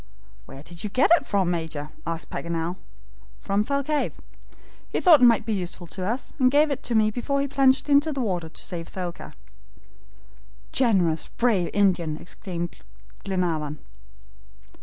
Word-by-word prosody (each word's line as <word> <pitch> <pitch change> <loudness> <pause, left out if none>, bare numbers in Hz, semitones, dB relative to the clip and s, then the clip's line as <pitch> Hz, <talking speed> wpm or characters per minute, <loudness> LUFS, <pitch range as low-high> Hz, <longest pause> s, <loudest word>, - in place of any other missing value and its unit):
"Where 135 - -11
did 170 +1 -8
you 210 - -2
get 255 +9 +3
it 280 - -4
from, 190 -3 +1
Major," 160 -3 -4 0.2
asked 165 -1 -4
Paganel. 170 +1 -3 0.6
"From 200 +1 0
Thalcave. 280 +4 -1 0.8
He - - -1
thought 330 -6 +7
it - - +8
might 230 -2 +5
be 225 - -1
useful 180 -2 -4
to 185 +3 -6
us, 235 +7 -3
and 255 -1 +5
gave 295 +2 +3
it 275 0 -2
to 240 - 0
me 215 -1 +4
before 275 +5 -1
he 280 - 0
plunged 265 0 +3
into 290 +2 +4
the 275 - -3
water 180 -9 -2
to - - -10
save 170 -2 -4
Thaouka." 180 -2 -6 1.4
"Generous, 190 -11 +2
brave 215 -8 +1
Indian!" 175 -6 +1
exclaimed 175 0 -6 0.5
Glenarvan. 165 -6 -1
195 Hz, 155 wpm, -25 LUFS, 170-260 Hz, 1.4 s, it